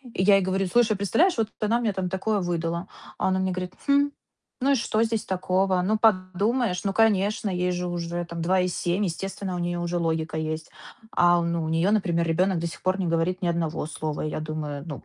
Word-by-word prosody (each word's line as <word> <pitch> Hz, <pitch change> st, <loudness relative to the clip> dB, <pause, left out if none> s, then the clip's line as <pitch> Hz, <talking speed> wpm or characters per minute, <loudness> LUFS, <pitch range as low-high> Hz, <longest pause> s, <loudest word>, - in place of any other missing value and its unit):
И 185 Hz, -, +1 dB
я 200 Hz, 0 st, +6 dB
ей 195 Hz, -, +4 dB
говорю: 190 Hz, 0 st, 0 dB
"Слушай, 220 Hz, +1 st, +3 dB
представляешь, 230 Hz, -, +2 dB
вот 220 Hz, -1 st, 0 dB
она 225 Hz, +2 st, +1 dB
мне 220 Hz, -3 st, +1 dB
там 185 Hz, -2 st, -3 dB
такое 200 Hz, +3 st, 0 dB
выдала". 170 Hz, 0 st, -2 dB, 0.3 s
А -, -, 0 dB
она 190 Hz, 0 st, +1 dB
мне 190 Hz, 0 st, 0 dB
говорит: 180 Hz, 0 st, -4 dB
"Хм, 285 Hz, 0 st, +4 dB, 0.5 s
ну 275 Hz, +2 st, +3 dB
и -, -, +5 dB
что 225 Hz, -2 st, +1 dB
здесь 225 Hz, -1 st, -1 dB
такого? 185 Hz, 0 st, +1 dB
Ну, 215 Hz, +4 st, +1 dB
подумаешь. 200 Hz, +1 st, +1 dB
Ну, 195 Hz, -, 0 dB
конечно, 210 Hz, -1 st, +2 dB
ей 180 Hz, 0 st, 0 dB
же 180 Hz, 0 st, -2 dB
уже, 175 Hz, 0 st, -3 dB
там, 170 Hz, -1 st, -6 dB
2,7. 180 Hz, +1 st, +1 dB
Естественно, 190 Hz, +1 st, -3 dB
у -, -, -3 dB
неё 175 Hz, 0 st, -2 dB
уже 175 Hz, 0 st, -1 dB
логика 160 Hz, -1 st, -1 dB
есть". 155 Hz, 0 st, -3 dB, 0.5 s
А, 175 Hz, 0 st, +5 dB
ну, 170 Hz, -1 st, -1 dB
у -, -, -3 dB
неё, 165 Hz, +5 st, +2 dB
например, 175 Hz, -5 st, +1 dB
ребёнок 180 Hz, +2 st, +2 dB
до 170 Hz, -, -2 dB
сих 165 Hz, -, -9 dB
пор 185 Hz, +1 st, +1 dB
не 180 Hz, -, 0 dB
говорит 170 Hz, +3 st, 0 dB
ни 175 Hz, -, 0 dB
одного 165 Hz, -2 st, -1 dB
слова. 155 Hz, -1 st, -4 dB
И 155 Hz, -, -2 dB
я -, -, -3 dB
думаю, 150 Hz, -2 st, -4 dB
ну, 145 Hz, -, -7 dB
180 Hz, 220 wpm, -25 LUFS, 170-200 Hz, 0.5 s, я